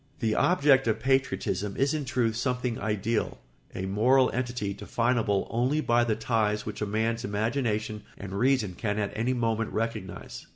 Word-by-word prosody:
] -, -, -32 dB
The 110 Hz, -2 st, +1 dB
object 140 Hz, -6 st, +4 dB
of 110 Hz, -, +1 dB
patriotism 105 Hz, -7 st, 0 dB
is 140 Hz, +3 st, +2 dB
in 150 Hz, -2 st, -2 dB
truth 120 Hz, -3 st, 0 dB
something 125 Hz, 0 st, -1 dB
ideal, 110 Hz, +1 st, -1 dB, 0.4 s
a 95 Hz, -, -3 dB
moral 125 Hz, +7 st, +3 dB
entity 120 Hz, -5 st, -2 dB
definable 115 Hz, -3 st, 0 dB
only 125 Hz, +6 st, +1 dB
by 120 Hz, -5 st, +3 dB
the 110 Hz, -2 st, +1 dB
ties 110 Hz, -2 st, 0 dB
which -, -, -6 dB
a 105 Hz, -, 0 dB
man's 115 Hz, +3 st, -1 dB
imagination 110 Hz, 0 st, -1 dB, 0.2 s
and 95 Hz, -1 st, -7 dB
reason 120 Hz, -2 st, +2 dB
can 105 Hz, +3 st, -2 dB
at 100 Hz, -1 st, -2 dB
any 115 Hz, +4 st, 0 dB
moment 115 Hz, -2 st, 0 dB
recognise. 110 Hz, -4 st, -4 dB
115 Hz, 165 wpm, -28 LUFS, 105-125 Hz, 0.4 s, object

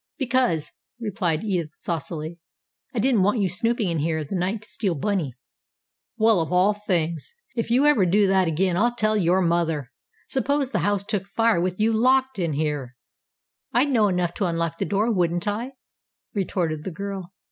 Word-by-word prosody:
"Because," 245 Hz, -, +1 dB, 0.3 s
replied 190 Hz, -7 st, -1 dB
Edith 175 Hz, -7 st, -2 dB
saucily, 165 Hz, 0 st, -5 dB, 0.5 s
"I 255 Hz, -, -7 dB
didn't 230 Hz, -1 st, +3 dB
want 205 Hz, +5 st, +2 dB
you 200 Hz, -, +2 dB
snooping 225 Hz, +4 st, 0 dB
in 165 Hz, -2 st, -1 dB
here 160 Hz, +2 st, 0 dB
in 155 Hz, -, -3 dB
the 195 Hz, -, -4 dB
night 190 Hz, +4 st, -1 dB
to -, -, -10 dB
steal 190 Hz, -6 st, -2 dB
bunny." 160 Hz, -, -1 dB, 0.8 s
"Well, 220 Hz, -5 st, +4 dB
of 160 Hz, -, -3 dB
all 185 Hz, +3 st, +4 dB
things! 170 Hz, -, -2 dB, 0.2 s
If 230 Hz, -1 st, -2 dB
you 255 Hz, +5 st, +4 dB
ever 275 Hz, -11 st, +4 dB
do 200 Hz, +4 st, +4 dB
that 190 Hz, -2 st, +3 dB
again, 175 Hz, +2 st, +1 dB
I'll 240 Hz, +4 st, +2 dB
tell 215 Hz, -2 st, +1 dB
your 185 Hz, -2 st, +3 dB
mother! 165 Hz, -6 st, 0 dB, 0.4 s
Suppose 275 Hz, 0 st, 0 dB
the -, -, 0 dB
house 205 Hz, -1 st, +1 dB
took 200 Hz, -2 st, -2 dB
fire 225 Hz, -4 st, +2 dB
with 185 Hz, +1 st, -2 dB
you 220 Hz, +1 st, +3 dB
locked 260 Hz, +1 st, +2 dB
in 165 Hz, -4 st, 0 dB
here." 145 Hz, -4 st, -2 dB, 0.8 s
"I'd 255 Hz, +5 st, +3 dB
know 220 Hz, -5 st, +4 dB
enough 180 Hz, -3 st, 0 dB
to 200 Hz, -, 0 dB
unlock 165 Hz, -1 st, -1 dB
the -, -, 0 dB
door, 210 Hz, +4 st, +1 dB
wouldn't 175 Hz, 0 st, 0 dB
I?" 230 Hz, +6 st, -2 dB, 0.6 s
retorted 170 Hz, -6 st, -1 dB
the -, -, -3 dB
girl. 195 Hz, 0 st, -6 dB
190 Hz, 180 wpm, -24 LUFS, 170-220 Hz, 0.8 s, Well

